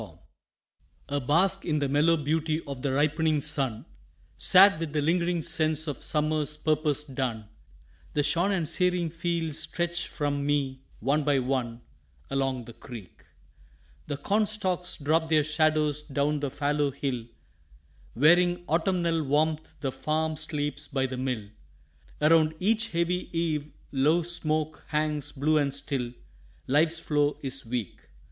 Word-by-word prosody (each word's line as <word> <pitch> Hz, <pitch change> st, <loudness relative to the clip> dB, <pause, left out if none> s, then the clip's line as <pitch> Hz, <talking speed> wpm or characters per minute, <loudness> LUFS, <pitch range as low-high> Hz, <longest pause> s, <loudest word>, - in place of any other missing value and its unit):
FULFILMENT -, -, -11 dB, 0.9 s
A 145 Hz, 0 st, 0 dB
bask 185 Hz, +9 st, +2 dB
in 155 Hz, -3 st, 0 dB
the 145 Hz, -1 st, 0 dB
mellow 150 Hz, +4 st, +3 dB
beauty 155 Hz, +1 st, 0 dB
of 140 Hz, -3 st, -6 dB
the 140 Hz, -, -1 dB
ripening 155 Hz, +2 st, +2 dB
sun, 135 Hz, -6 st, -2 dB, 0.5 s
Sad 195 Hz, -2 st, +6 dB
with 165 Hz, -3 st, -4 dB
the 150 Hz, -, +1 dB
lingering 170 Hz, +1 st, +1 dB
sense 155 Hz, 0 st, 0 dB
of 145 Hz, -3 st, -5 dB
summer's 150 Hz, -1 st, 0 dB
purpose 150 Hz, -2 st, 0 dB
done, 130 Hz, -6 st, -3 dB, 0.7 s
The 145 Hz, -, +2 dB
shorn 175 Hz, +6 st, +2 dB
and 175 Hz, -5 st, 0 dB
searing 180 Hz, 0 st, +1 dB
fields 165 Hz, -2 st, -2 dB
stretch 175 Hz, 0 st, -2 dB
from 145 Hz, -2 st, -2 dB
me 140 Hz, -2 st, -1 dB, 0.2 s
one 140 Hz, +6 st, +1 dB
by 145 Hz, -1 st, +2 dB
one 125 Hz, -2 st, -2 dB, 0.5 s
Along 135 Hz, -3 st, -1 dB
the 120 Hz, -, -10 dB
creek. 115 Hz, -10 st, -11 dB, 0.8 s
The 145 Hz, -2 st, -3 dB
corn 205 Hz, +9 st, +1 dB
stalks 185 Hz, -4 st, -1 dB
drop 160 Hz, +2 st, +1 dB
their 155 Hz, -2 st, +4 dB
shadows 155 Hz, -1 st, +1 dB
down 145 Hz, 0 st, -1 dB
the 140 Hz, -1 st, -2 dB
fallow 145 Hz, +1 st, 0 dB
hill; 130 Hz, -4 st, -3 dB, 0.9 s
Wearing 175 Hz, +6 st, +4 dB
autumnal 170 Hz, 0 st, +1 dB
warmth 155 Hz, +2 st, 0 dB
the 135 Hz, -3 st, -1 dB
farm 155 Hz, +3 st, -1 dB
sleeps 145 Hz, -2 st, -3 dB
by 135 Hz, -2 st, 0 dB
the 130 Hz, -1 st, -4 dB
mill, 125 Hz, -5 st, -2 dB, 0.7 s
Around 155 Hz, 0 st, +4 dB
each 225 Hz, +4 st, +2 dB
heavy 175 Hz, 0 st, -1 dB
eave 155 Hz, -3 st, -1 dB, 0.2 s
low 150 Hz, +5 st, +3 dB
smoke 155 Hz, -2 st, -2 dB
hangs 150 Hz, -1 st, -1 dB
blue 155 Hz, +2 st, +2 dB
and 140 Hz, -1 st, +1 dB
still 135 Hz, -3 st, -2 dB, 0.5 s
Life's 160 Hz, +4 st, +2 dB
flow 145 Hz, -2 st, +1 dB
is 135 Hz, 0 st, -1 dB
weak. 115 Hz, -5 st, -4 dB
150 Hz, 140 wpm, -27 LUFS, 140-165 Hz, 0.9 s, Sad